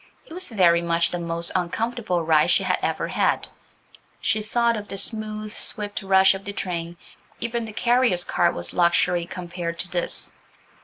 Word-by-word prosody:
It - - -12
was 365 +2 0
very 175 -6 +4
much 170 0 +1
the 175 - -3
most 170 0 -3
uncomfortable 185 +1 -1
ride 155 -1 +4
she - - +3
had - - +1
ever - - -1
had. - - +1 0.7
She 220 -2 0
thought 235 +2 +1
of 210 -1 -6
the 195 - -6
smooth, 215 0 -1
swift 210 -1 -4
rush 190 0 +5
of 195 0 -7
the 200 - -6
train–even 185 +7 -5
the 220 - -7
carrier's 240 -6 +3
cart - - +1
was 85 0 -5
luxury 175 0 +2
compared 175 -2 -5
to 180 - -4
this. 175 -1 -1
190 Hz, 165 wpm, -24 LUFS, 170-220 Hz, 0.7 s, rush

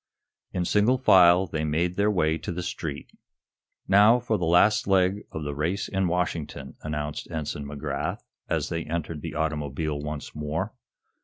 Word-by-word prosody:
In 90 -1 -1
single 105 +8 +3
file 90 -7 +6
they 80 -3 -3
made 80 +4 0
their 100 +2 +2
way 80 -5 +1
to - - -5
the 90 +1 -4
street. 75 -4 -5 0.8
"Now, 105 +5 +6
for 115 -4 -1
the 85 - -1
last 95 +6 +4
leg 95 +1 +2
of 80 - -5
the 75 0 -3
race 85 +7 -1
in 95 -1 0
Washington," 85 -6 -3
announced 75 -1 -4
Ensign 75 -3 -4
McGrath, 70 -1 -4 0.3
as - - 0
they 80 0 -2
entered 85 -2 -4
the - - -6
automobile 75 -1 -2
once 75 0 -6
more. 75 +1 -3
80 Hz, 160 wpm, -26 LUFS, 75-95 Hz, 0.8 s, file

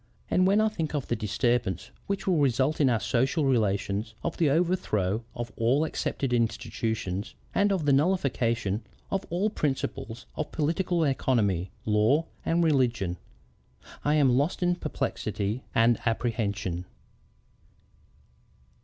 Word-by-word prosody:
And 185 0 +4
when 200 +2 +4
I 220 - +4
think 165 -8 -3
of 140 - -2
the 120 - +1
disturbance 115 0 0 0.2
which 200 0 -2
will 185 -3 +2
result 140 +2 +2
in 135 - +5
our 115 -3 +2
social 130 +7 +1
relations, 105 -3 0
of 170 - -2
the 160 -4 +3
overthrow 135 - +1
of 120 0 -5
all 125 +6 +2
accepted 135 -4 -2
institutions, 110 -3 -2 0.2
and 205 0 +3
of 185 -6 0
the 140 - +4
nullification 120 - +1 0.3
of 195 - -1
all 190 +5 0
principles 135 - -3
of 150 -1 -3
political 165 +2 0
economy, 110 - +1 0.2
law, 110 +9 +3 0.2
and 170 +1 +2
religion, 120 - +1 0.9
I 150 +1 +2
am 135 -5 +4
lost 145 +7 +1
in 175 0 +3
perplexity 110 - -2
and 115 +1 +4
apprehension." 105 -6 -1
130 Hz, 130 wpm, -27 LUFS, 110-155 Hz, 0.9 s, in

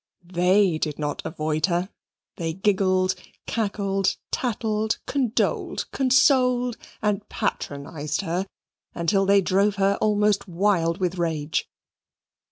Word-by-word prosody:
THEY 180 -1 +3
did 150 -2 -2
not 145 -1 -3
avoid 155 +2 -1
her. 175 +1 -1 0.5
They 165 -2 -2
giggled, 185 -1 +2 0.3
cackled, 200 -3 0 0.2
tattled, 220 -3 -1
condoled, 255 -5 0
consoled, 250 -2 +3 0.3
and 210 -1 -1
patronized 150 -5 -3
her 185 +1 -2 0.5
until 195 +3 +1
they 200 0 +5
drove 195 +2 +2
her 200 0 +2
almost 210 -1 +2
wild 175 -2 +1
with 185 -2 -2
rage. 160 -2 -1
195 Hz, 105 wpm, -24 LUFS, 170-210 Hz, 0.5 s, they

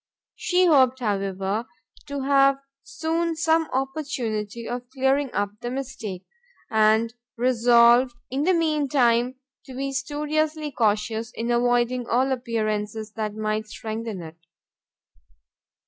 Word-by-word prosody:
She 365 0 +2
hoped, 260 -6 +5
however, 200 0 -2 0.4
to 285 -1 -4
have 275 0 +4 0.2
soon 330 +1 -2
some 320 0 +2
opportunity 240 -6 -3
of 245 0 -5
clearing 265 +1 +1
up 205 0 -1
the 240 - -3
mistake, 245 -8 -5 0.5
and 220 +1 +3 0.2
resolved 240 0 +5 0.2
in 270 +2 -1
the 365 +4 +3
mean 305 -4 +1
time 245 -2 +2 0.3
to 260 - -9
be 275 +1 -2
studiously 300 +2 -1
cautious 220 0 0
in 235 +1 -2
avoiding 245 0 +1
all 260 +3 +2
appearances 215 -3 -2
that 215 -1 -4
might 215 0 -2
strengthen 220 -3 -5
it. 160 0 -11
245 Hz, 115 wpm, -24 LUFS, 220-275 Hz, 0.5 s, hoped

